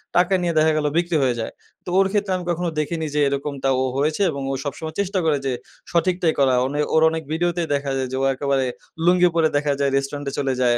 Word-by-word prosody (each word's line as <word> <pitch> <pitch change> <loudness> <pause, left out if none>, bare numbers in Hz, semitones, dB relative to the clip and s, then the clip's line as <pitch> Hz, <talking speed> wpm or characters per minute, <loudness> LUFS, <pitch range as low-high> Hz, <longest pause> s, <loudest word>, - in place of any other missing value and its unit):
টাকা 175 +2 +3
নিয়ে 175 -1 0
দেখা 155 +1 +5
গেলো 150 -1 +1
বিক্রি 170 -1 +1
হয়ে 125 -2 +1
যায়। 110 - -3 0.3
তো - - -5
ওর 195 - +4
ক্ষেত্রে 205 -1 0
আমি 180 - -4
কখনো 175 +1 -1
দেখিনি 160 +1 -2
যে - - +2
এরকমটা 140 0 -2
ও - - +2
হয়েছে 150 +6 0
এবং 140 -2 -5
ও - - -1
সবসময় 155 +2 -5
চেষ্টা 200 -1 0
করে 155 -2 +3
যে 135 - 0 0.4
সঠিকটাই 175 -1 +2
করা। 135 -2 +4
ওনে 145 +3 -2
ওর 160 - +5
অনেক 160 0 -4
ভিডিওতেই 175 +1 0
দেখা 140 -1 -1
যায় 130 -1 -1
যে - - -2
ও - - +2
একেবারে 135 0 0 0.4
লুঙ্গি 180 0 +5
পরে 165 -1 +4
দেখা 145 0 +1
যায় 140 -1 +2
রেস্টুরেন্টে 140 +1 -2
চলে 135 -2 0
যায় 120 -1 +3
155 Hz, 230 wpm, -22 LUFS, 140-175 Hz, 0.4 s, দেখা